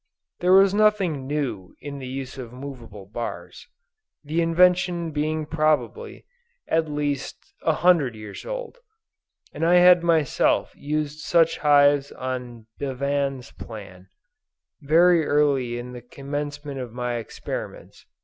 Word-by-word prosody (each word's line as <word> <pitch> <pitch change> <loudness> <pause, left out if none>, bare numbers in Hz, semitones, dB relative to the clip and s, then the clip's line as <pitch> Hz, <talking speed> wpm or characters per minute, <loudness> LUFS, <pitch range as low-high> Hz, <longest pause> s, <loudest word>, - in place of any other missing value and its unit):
There 180 +1 +3
was 195 0 +6
nothing 195 -10 +2
new 130 -11 -3
in 140 -1 -7
the 130 - -7
use 135 0 -6
of 120 -3 -7
movable 125 -6 -9
bars; 115 +4 -7 0.6
the 155 +3 -1
invention 175 0 +2
being 155 +1 -1
probably, 155 -5 -1 0.4
at 160 -1 +1
least, 145 -2 -4
a 160 - +2
hundred 155 -10 +4
years 105 -2 -9
old; - - -6 0.7
and - - -4
I 170 +2 +4
had 180 0 +7
myself 165 -4 +2
used 150 0 -3
such 165 +1 +2
hives 145 -1 +4
on 125 -3 -6
Bevan's 140 -1 -2
plan, 95 -5 -11 0.7
very 165 +3 +4
early 140 -5 +1
in 120 +1 -7
the 125 - -8
commencement 145 +2 -6
of 125 -3 -6
my 120 0 -3
experiments. 115 - -7
145 Hz, 125 wpm, -24 LUFS, 125-165 Hz, 0.7 s, had